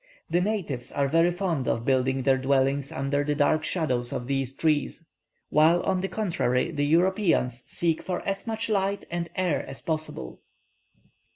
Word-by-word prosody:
The 175 +2 +3
natives 180 - -2
are 140 -1 +1
very 165 +4 +3
fond 175 -7 -2
of 115 +1 -1
building 130 0 +1
their 130 0 +3
dwellings 135 +1 +1
under 140 +1 -1
the 145 0 -1
dark 155 +2 +2
shadows 130 -8 -1
of 120 - -3
these 135 0 -2
trees; 155 +1 0 0.4
while, 160 +3 +4
on 190 -1 0
the 195 - -1
contrary, 165 - 0
the 145 0 0
Europeans 165 - +2
seek 165 -2 0
for 180 -1 -3
as 195 +3 -3
much 225 0 -2
light 200 -2 0
and 170 0 -3
air 180 -7 0
as 135 - -6
possible. 155 - -4
155 Hz, 165 wpm, -26 LUFS, 135-180 Hz, 0.4 s, while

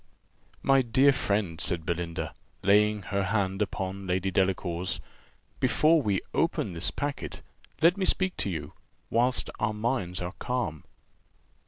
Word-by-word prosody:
"My 135 -1 +5
dear 130 +3 +4
friend," 100 -8 -1
said 85 -3 0
Belinda, 85 0 -3 0.3
laying 105 +1 +4
her 100 +1 -1
hand 95 0 0
upon 95 -1 -3
Lady 95 +1 0
Delacour's, 90 -1 0 0.6
"before 160 +1 +4
we 100 -7 0
open 90 - 0
this 85 +1 0
packet, 145 -1 -4 0.4
let 175 +4 +6
me 190 - 0
speak 185 -1 +1
to - - 0
you, 80 -5 -5 0.4
whilst 125 +2 +2
our 105 0 0
minds 105 -6 -1
are 90 +1 -4
calm." 120 -12 -2
100 Hz, 135 wpm, -28 LUFS, 90-125 Hz, 0.6 s, let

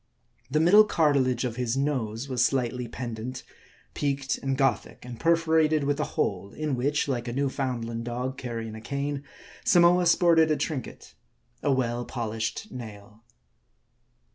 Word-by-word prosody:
The 150 +3 +1
middle 185 +7 +7
cartilage 140 - +2
of 120 -1 -4
his 125 0 -1
nose 130 -4 -1
was 125 -3 +1
slightly 125 -2 0
pendent, 120 +1 -6 0.5
peaked, 140 -1 -1
and 135 -1 -2
Gothic, 135 -4 -1
and 120 -2 -8
perforated 160 -2 +3
with 145 +1 0
a - - +1
hole; 100 0 -1
in 155 -3 -2
which, 145 +5 0
like 125 -3 -2
a - - -2
Newfoundland 125 -4 -2
dog 125 +2 -3
carrying 115 -4 -5
a 110 - -8
cane, 140 +3 -3 0.4
Samoa 175 0 +5
sported 165 -2 +5
a 155 - +2
trinket: 145 -2 -5 0.5
a 145 - +1
well 120 -2 0
polished 115 - -4
nail. 110 -3 -10
130 Hz, 140 wpm, -27 LUFS, 120-150 Hz, 0.5 s, middle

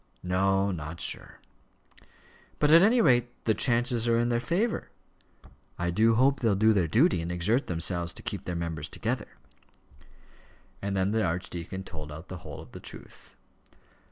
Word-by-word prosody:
"No; 95 +2 +1
not 80 -1 -6
sure." - - -4 1.2
"But 150 0 +3
at 165 +1 +9
any 230 +5 +5
rate 125 - +4 0.2
the 110 - +3
chances 120 +1 0
are 115 0 +3
in 120 +1 +1
their 120 -1 +1
favour? 190 - -1 0.9
I 85 0 -1
do 110 +5 +3
hope 135 +4 +3
they'll 110 -4 +2
do 110 +3 +4
their 95 -5 +2
duty, 120 - +3
and 85 +1 -4
exert 100 +9 0
themselves 85 0 -1
to - - -8
keep - - -5
their 90 - -3
members 80 -3 -4
together." - - -4 1.4
And 100 0 -2
then 95 +1 +1
the 110 0 +1
archdeacon 90 +1 -4
told 75 -5 -8
out 80 +4 -10
the 90 - -6
whole - - -9
of - - -14
the - - -9
truth. - - -13
100 Hz, 165 wpm, -28 LUFS, 85-120 Hz, 1.4 s, at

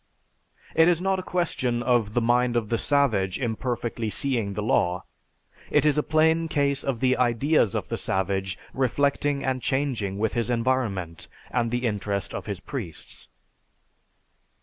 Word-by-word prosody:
It 160 0 +5
is 175 -2 +3
not 190 +1 0
a - - -2
question 130 -10 -1
of 120 -4 +1
the 120 - +3
mind 120 +1 +2
of 115 -3 0
the 115 - 0
savage 110 -11 +1
imperfectly 120 -1 -2
seeing 115 -5 -1
the 105 - -2
law. 90 -4 +1 0.7
It - - +3
is 150 -2 +4
a 150 - +3
plain 160 +2 +2
case 140 -3 +1
of 130 -4 -2
the 130 0 +3
ideas 125 - +2
of - - -3
the - - -2
savage 95 0 -1 0.2
reflecting 140 +2 +1
and 130 -1 -1
changing 125 -9 -1
with 110 +1 0
his 120 -1 -1
environment 115 -9 -1 0.2
and 120 -2 +1
the 120 +1 -1
interest 100 -2 -2
of - - -5
his 100 -3 -4
priests." 100 - -7
120 Hz, 155 wpm, -25 LUFS, 105-140 Hz, 0.7 s, It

